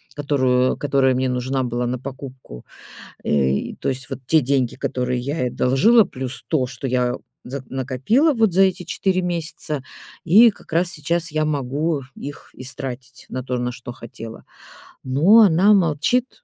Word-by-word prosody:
которую 130 -3 +1
которая 135 -2 +2
мне 130 0 0
нужна 130 +2 -1
была 120 0 -2
на 125 +1 -2
покупку. 130 - -9 0.6
Э, 70 -2 0
то - - -2
есть 130 -1 -4
вот - - -5
те 160 +3 +4
деньги, 130 -2 0
которые 125 0 -2
я 140 +6 -3
ей 125 - +1
одолжила, 200 - +4
плюс 130 -4 -6
то, 140 -6 +1
что 130 +1 -6
я 125 -1 0 0.3
за 135 +2 -6
накопила 135 - +1
вот 225 -5 +2
за 190 +3 +4
эти 190 -1 +1
4 185 +2 0
месяца. 165 -4 -3 0.4
И 215 +8 +7
как 200 - -17
раз 170 +2 +2
сейчас 165 +3 -2
я 155 0 +1
могу 145 +1 -1
их 145 +1 -9
истратить 130 0 -7
на 130 - -4
то, 125 -1 -2
на 125 0 -2
что 120 0 -9
хотела. 115 -2 -10 0.6
Но 160 - +5
она 195 +1 +5
молчит. 200 - +1
135 Hz, 160 wpm, -21 LUFS, 125-170 Hz, 0.6 s, И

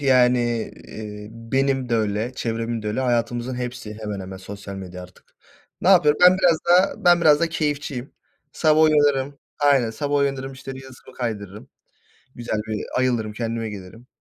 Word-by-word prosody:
yani, 125 -4 +2 0.2
iii, 105 -1 -8
benim 135 +3 -1
de 115 - +1
öyle 110 +3 -1
çevremin 115 -1 -3
de 105 - -3
öyle 105 - -2
hayatımızın 120 0 -1
hepsi 125 -3 -6
hemen 105 -2 -4
hemen 95 0 -7
sosyal 100 +1 -9
medya 90 -1 -8
artık. 90 0 -17 0.4
Ne 180 - +1
yapıyorum? 150 -6 +5
Ben 180 +1 +7
biraz 170 -3 +4
daha 180 +2 +3
ben 175 -1 +6
biraz 150 -3 +5
da 170 - +2
keyifçiyim 145 -5 -3 0.4
sabah 155 -1 +3
uyanırım 145 -3 +3 0.2
Aynen. 140 -5 +3
Sabah 145 +6 -2
uyanırım, 135 -1 -1
işte, 130 +1 -8
Reels'ımı 130 -1 -13
kaydırırım. 105 -4 -5 0.7
Güzel 120 -2 -3
bir 110 -1 -3
ayılırım, 120 -4 0
kendime 115 0 -3
gelirim. 105 +4 -11
125 Hz, 155 wpm, -22 LUFS, 110-140 Hz, 0.7 s, Ben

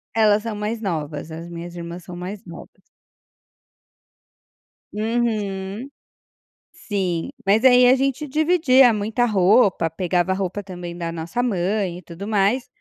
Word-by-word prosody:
Elas 215 -1 +4
são 225 -2 -4
mais 215 +2 -3
novas, 155 -4 -4
as 165 +2 -7
minhas 170 +1 -8
irmãs 170 +1 -7
são 180 0 -9
mais 185 +3 -7
novas. 170 -2 -12 2.1
Uhum. 215 -1 -2 0.9
Sim, 185 -5 -2 0.2
mas 210 +5 +3
aí 250 -1 +7
a 255 - +6
gente 275 +2 -1
dividia 290 -4 +4
muita 220 +4 0
roupa, 200 -3 +3
pegava 180 +2 0
roupa 195 +1 -3
também 175 -2 -8
da 170 -1 -3
nossa 165 +9 -3
mãe 190 -4 -1
e - - -13
tudo 175 +4 -9
mais. 215 +4 +1
200 Hz, 130 wpm, -22 LUFS, 175-230 Hz, 2.1 s, aí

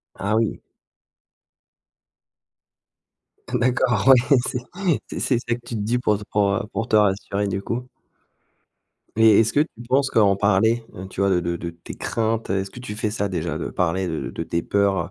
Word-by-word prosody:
Ah 105 +2 -1
oui! 115 -1 0 2.9
D'accord. 120 -2 +1
Ouais, 135 +1 +6
c'est 125 - -2 0.5
c'est - - -6
c'est 125 - +1
ça 120 -1 -2
que 120 - -13
tu 120 - -5
te - - -2
dis 115 +4 0
pour, 105 -4 +1
heu, - - -5
pour, 100 -1 +2
heu, - - -2
pour 115 +1 -3
te 110 - +2
rassurer, 100 0 +1
du 95 0 -2
coup. 125 +4 -4 1.3
Mais 110 -2 +6
est-ce 115 0 +2
que 145 - +3
tu 155 - 0 0.2
penses 135 +1 +2
qu'en 100 -3 +4
parler, 110 +4 +2
heu, 95 +1 -7
tu 95 - -5
vois 100 - +3
de 90 -2 +3
de 85 0 -2
de 85 0 -5
tes 85 0 -11
craintes, 115 -1 -2
heu, 95 - +1
est-ce 95 0 -4
que 125 - -11
tu 105 -4 -6
fais 110 0 -1
ça, 100 -1 -2
déjà, 85 -4 -3
de - - -4
parler 90 +1 0
de 80 -2 -3
de 85 - -5
tes 85 +1 -2
peurs, 100 -1 +1
105 Hz, 195 wpm, -23 LUFS, 95-115 Hz, 2.9 s, Ouais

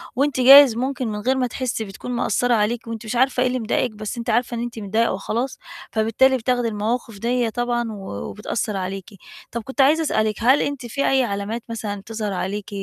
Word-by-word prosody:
وأنتِ 275 +1 +1
جايز 270 -1 +9
ممكن 260 0 -2
من 210 -1 -3
غير 255 +5 +1
ما 255 -1 +1
تحسي 245 -2 -3
بتكون 195 +5 -8
مأثرة 245 0 +1
عليكِ، 230 +2 0
وأنتِ 230 0 -6
مش 220 - -4
عارفة 255 +1 +2
إيه 255 - +3
اللي 255 0 -1
مضايقِك، 235 +2 0
بس 215 +1 -6
أنتِ 235 +1 -4
عارفة 245 0 +1
إن - - -3
أنتِ 240 -1 -6
متضايقة 220 +3 0
وخلاص، 230 +7 -3 0.3
فبالتالي 225 +4 +3
بتاخدي 245 0 0
المواقف 220 0 -3
ديّة 240 +1 0
طبعًا، 240 0 -1
و 205 -2 -8 0.3
وبتأثر 210 0 -3
عليكِ. 190 0 -5 0.4
طب 235 - -3
كنت 265 +4 -1
عايزة 305 +4 +4
أسألِك، 215 -8 0
هل 255 +5 +4
أنتِ 280 -4 -3
في 275 +4 -1
أي 265 -1 +3
علامات 210 +1 -3
مثلًا 210 -3 -4
تظهر 215 -2 -4
عليكِ 195 +2 -4
235 Hz, 200 wpm, -22 LUFS, 215-250 Hz, 0.4 s, جايز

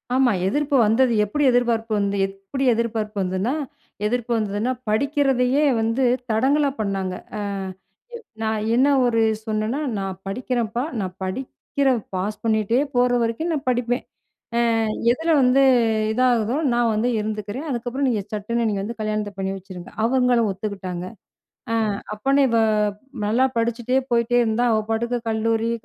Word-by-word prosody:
ஆமா. 260 -2 +4 0.2
எதிர்ப்பு 290 +6 0
வந்தது. 235 +3 +3
எப்பிடி 295 +8 -1
எதிர்பார்ப்பு 230 -2 +1
வந்து 200 0 0
எப்பிடி 195 +8 -5
எதிர்பார்ப்பு 220 -2 -2
வந்தன்னா 190 +7 -1 0.5
எதிர்ப்பு 240 +2 -1
வந்ததுன்னா, 215 +2 -1 0.2
படிக்கிறதையே 270 +2 +2 0.2
வந்து 230 +4 0 0.3
தடங்கலா 280 +6 +2
பண்ணாங்க. 195 -3 -2 0.2
அ - - -3 1.0
நான் 220 -1 -1
என்ன 260 +3 +4 0.2
ஒரு 230 -2 +2 0.2
சொன்னன்னா, 220 +4 -1 0.2
'நான் 190 -1 -4
படிக்கிறேன்ப்பா. 240 +1 -2 0.2
நான் 185 -2 -4
படிக்கிற 265 +6 -2 0.3
பாஸ் 200 +3 -2
பண்ணிட்டே 220 +1 +2 0.2
போற 245 0 +4
வரைக்கும் 230 +10 -1
நான் 295 -2 -3
படிப்பேன். 245 0 0 0.5
அ - - +3 0.5
எதில 325 +6 -1
வந்து 260 +2 +4 0.5
இதாகுதோ! 245 0 +2 0.2
நான் 240 -1 +2
வந்து 220 +3 +1
இருந்துக்கிறேன். 215 +6 -4
அதுக்கப்பறம் 255 +2 -1
நீங்க 215 -5 -1
சட்டுன்னு 230 +3 -1
நீங்க 200 -2 -1
வந்து 230 +3 -6
கல்யாணத்த 215 -1 -2
பண்ணி 190 0 -1
வச்சுருங்க.' 185 -2 -10
அவுங்களும் 245 -2 +3
ஒத்துக்கிட்டாங்க. 190 -3 -5 0.7
அ - - +2 0.4
"அப்பன்னே 275 +6 +2
இவ 230 0 +3 0.7
நல்லா 240 +5 +3
படிச்சுட்டே 235 +2 +1
போயிட்டே 235 +1 +2
இருந்தா, 225 +2 +1
அவ 220 - +3
பாட்டுக்கு 235 +2 0
கல்லூரி 225 +1 0
230 Hz, 130 wpm, -22 LUFS, 210-250 Hz, 1.0 s, ஆமா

